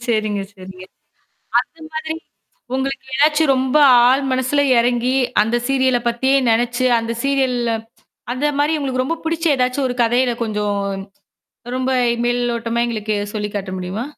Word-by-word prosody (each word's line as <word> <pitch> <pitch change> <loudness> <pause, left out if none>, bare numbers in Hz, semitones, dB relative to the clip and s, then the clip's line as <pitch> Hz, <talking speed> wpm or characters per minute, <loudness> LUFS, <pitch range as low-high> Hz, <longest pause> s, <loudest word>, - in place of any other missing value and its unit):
சரிங்க, 215 -3 0
சரிங்க. 185 -1 -11 0.8
அந்த 330 - -12
மாதிரி 315 0 -3 0.6
உங்களுக்கு 270 +1 -3
ஏதாச்சும் 300 +2 +3
ரொம்ப 260 +2 +1 0.3
ஆழ் 265 +2 +3
மனசுல 260 +3 +1 0.2
இறங்கி 245 +2 +1 0.3
அந்த 225 +3 0
சீரியல 260 -2 +2
பத்தியே 260 +3 +1 0.2
நெனச்சு 240 +2 +1
அந்த 230 0 -3
சீரியல்ல 260 -4 +1 0.6
அந்தமாரி 290 +3 0
உங்களுக்கு 260 -3 -1
ரொம்ப 330 +5 -2
பிடிச்ச 330 +1 -2
ஏதாச்சும் 255 +2 0
ஒரு 245 - -4
கதையில 245 +2 +2
கொஞ்சம் 210 -2 -2 1.0
ரொம்ப 260 0 -1 0.4
மேல் 245 0 0
ஓட்டமா 235 0 -1
எங்களுக்கு 215 -2 -2 0.2
சொல்லி 210 -1 -2
காட்ட 195 -2 -4
முடியுமா? 185 +5 -4
250 Hz, 130 wpm, -19 LUFS, 230-275 Hz, 1.0 s, ஏதாச்சும்